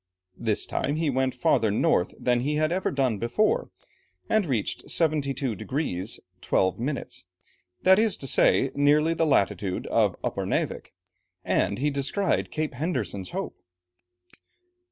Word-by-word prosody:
This 110 -3 0
time 145 - -2
he 155 -2 0
went 130 0 0
farther 130 -9 +2
north 100 -3 +1
than 125 -1 +2
he 145 +5 -1
had 155 +1 +1
ever 185 +2 0
done 130 -7 0
before, 215 - +1 0.6
and 215 -5 +2
reached 120 -7 -2
72 140 -6 0
degrees 110 - -3 0.2
12 95 +2 +1
minutes, 130 -6 -4 0.6
that 190 +2 +6
is 220 -2 +2
to 135 - -5
say, 135 +1 +3
nearly 150 +3 +3
the 165 0 +1
latitude 100 - +1
of - - +2
Upernavik, - - -2 0.5
and - - +1
he 145 +4 0
descried 140 +8 0
Cape 155 -1 -3
Henderson's 120 - -3
Hope. - - -5
140 Hz, 135 wpm, -26 LUFS, 115-155 Hz, 0.6 s, that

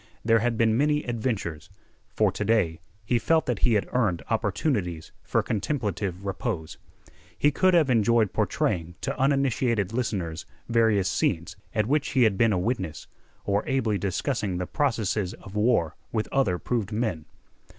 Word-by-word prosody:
There 115 0 +5
had 115 0 0
been 110 -1 +3
many 150 +3 +2
adventures. 110 - -3 0.5
For - - +3
to - - -3
day 100 -7 +1 0.3
he 120 +2 +2
felt 160 +7 +2
that 125 -4 -1
he 120 -3 +3
had 105 - +1
earned 100 - +1
opportunities 90 - -1
for - - 0
contemplative 100 - -2
repose. 95 -4 -4 0.6
He 145 - +3
could 185 +5 +3
have 160 -4 +4
enjoyed 115 -4 +3
portraying 85 0 -1
to - - -2
uninitiated 130 -6 +1
listeners 95 -10 -2 0.2
various 110 -5 +3
scenes 85 -3 -1 0.2
at 110 -1 +2
which 145 +4 0
he 130 - +4
had 110 -4 +3
been 115 +3 +3
a 95 - +1
witness 95 -5 -2 0.4
or 100 0 +1
ably 115 -6 +1
discussing 100 0 -1
the 90 - -2
processes 110 -7 -1
of 95 - -13
war 105 -7 +2 0.2
with 110 -1 -1
other 105 -10 +2
proved 115 0 -2
men. 105 -8 -2
110 Hz, 155 wpm, -26 LUFS, 95-125 Hz, 0.6 s, There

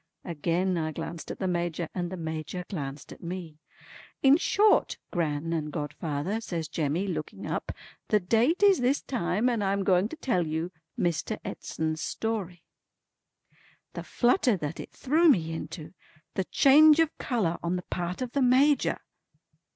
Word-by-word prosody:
Again 175 +2 0
I 155 -1 -2
glanced 165 +2 -6
at - - -5
the 190 - -2
Major, 175 -1 -1
and 175 -1 -3
the 185 - -5
Major 160 +2 -5
glanced 145 -6 -6
at - - -16
me. 170 -3 -6 0.6
"In 275 +1 +7
short, 410 +5 +3
Gran 165 -1 -1
and 155 -2 -2
godfather," 150 +6 -3
says 170 -7 -4
Jemmy, 160 +5 -1
looking 160 -6 -5
up, - - -3 0.4
"the 210 - +3
date 235 - +2
is 400 -2 +6
this 255 +3 +1
time, 210 -2 0
and 235 -4 +1
I'm 195 0 0
going 190 +2 +3
to - - -7
tell 185 - 0
you 160 +3 -2 0.3
Mr. 170 -3 -1
Edson's 160 0 -3
story." 195 -7 -3 1.3
The - - -5
flutter 245 - +2
that 150 -1 -5
it - - -8
threw 320 +5 +3
me 165 - +2
into. 160 0 -7 0.4
The 190 - -1
change 300 - +6
of 325 -1 +2
colour 200 -10 -1
on 170 +1 -1
the 180 - -3
part 180 +6 -2
of 245 - -5
the 280 - 0
Major! 265 +3 +4
180 Hz, 160 wpm, -28 LUFS, 165-240 Hz, 1.3 s, In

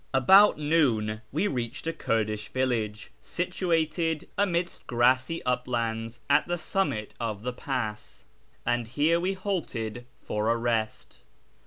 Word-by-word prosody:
About 190 +11 +7
noon 125 -9 +1
we 160 +9 +1
reached 120 - -4
a 165 - -1
Kurdish 110 -7 -1
village, 115 -5 -1
situated 165 -3 -1
amidst 180 -3 -1
grassy 130 +6 +2
uplands 115 -2 -2
at 145 +1 +3
the 175 0 -1
summit 165 - -2
of 110 -3 -3
the 125 0 -2
pass, 110 - -4 0.4
and 120 -1 0
here 150 +7 +2
we 185 +3 0
halted 125 - -3
for 105 +1 -1
a 115 - +3
rest. 115 - -2
125 Hz, 125 wpm, -27 LUFS, 115-165 Hz, 0.4 s, About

